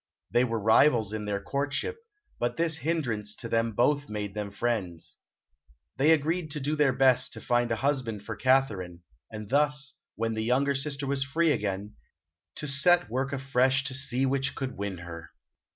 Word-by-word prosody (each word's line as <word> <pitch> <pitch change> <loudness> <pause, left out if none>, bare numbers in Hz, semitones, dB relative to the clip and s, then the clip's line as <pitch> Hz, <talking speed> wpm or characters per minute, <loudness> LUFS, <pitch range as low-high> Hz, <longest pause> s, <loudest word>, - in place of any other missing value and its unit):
They 120 - +4
were 115 -2 -1
rivals 110 0 +4
in 105 -1 -4
their 100 -1 -1
courtship, 145 - -2 0.4
but 120 - -1
this 165 -2 +2
hindrance 120 -11 -2
to 115 - -3
them 115 0 0
both 145 +6 +1
made 105 -2 -4
them 105 -1 -4
friends. 100 -6 -3 0.8
They 145 +4 +3
agreed 160 +2 +2
to 150 0 -4
do 145 +2 -1
their 150 -3 +3
best 130 -1 +3
to - - -5
find 120 0 +1
a - - +2
husband 125 -5 -1
for 110 - -5
Katharine, 100 -11 +1 0.3
and 110 -2 -7
thus, 145 +1 +1 0.2
when 115 0 -1
the 110 0 -2
younger 135 +4 +2
sister 140 +1 -2
was 140 0 0
free 160 +4 +1
again, 105 -4 -3 0.6
to 150 - -4
set 160 +6 +5
to - - -19
work 130 +2 -1
afresh 135 -1 +1
to 135 -1 -3
see 135 -1 +1
which 135 +1 0
could 130 -1 -4
win 100 -1 -4
her. 85 -1 -9
130 Hz, 180 wpm, -28 LUFS, 110-140 Hz, 0.8 s, set